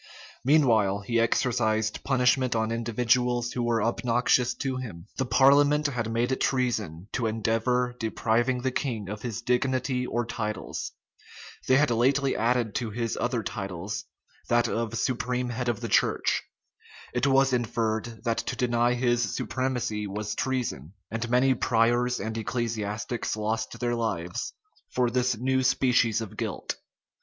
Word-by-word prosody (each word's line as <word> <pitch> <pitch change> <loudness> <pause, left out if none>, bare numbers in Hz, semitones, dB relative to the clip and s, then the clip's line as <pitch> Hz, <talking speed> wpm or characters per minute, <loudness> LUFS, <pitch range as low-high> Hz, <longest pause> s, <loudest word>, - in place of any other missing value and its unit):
Meanwhile 115 -9 +3
he 115 +4 0
exercised 110 -2 +1
punishment 130 -1 +2
on 110 0 0
individuals 120 +1 +1
who 125 - -2
were 115 -2 +1
obnoxious 120 +1 +2
to 135 -2 -2
him. 100 -10 -7
The 130 - -1
parliament 145 +3 +5
had 120 -5 -1
made 120 +3 0
it 130 - -1
treason 110 -10 -1
to 115 - 0
endeavor 115 +3 0
depriving 120 +3 0
the 130 - +1
king 115 -6 -2
of 105 +1 -5
his 120 -1 -4
dignity 125 +1 0
or 120 0 -1
titles: 105 -2 -4 0.7
they 130 - +5
had 145 -2 +3
lately 135 +4 +2
added 115 -2 +1
to 120 -3 -2
his 115 +1 -2
other 120 -2 0
titles, 95 -1 -4 0.4
that 120 0 +3
of 115 0 -2
supreme 125 0 -1
head 120 +1 -2
of 120 -1 -2
the 115 - -3
church: - - +2 0.7
it 125 +3 +1
was 135 -1 +4
inferred, 115 -1 -1
that 115 -2 0
to - - -3
deny 120 -1 +2
his 120 -1 +1
supremacy 125 -5 -2
was 105 +1 -3
treason; 120 - -2 0.2
and 115 +1 -3
many 125 +2 +4
priors 120 +1 +2
and 110 +2 -4
ecclesiastics 110 -1 -2
lost 110 +1 -2
their 120 -1 0
lives 90 -7 -2 0.4
for 125 -1 +1
this 125 -1 +1
new 130 +3 +1
species 125 -3 +3
of 110 - -7
guilt. - - -3
120 Hz, 145 wpm, -27 LUFS, 110-125 Hz, 0.7 s, parliament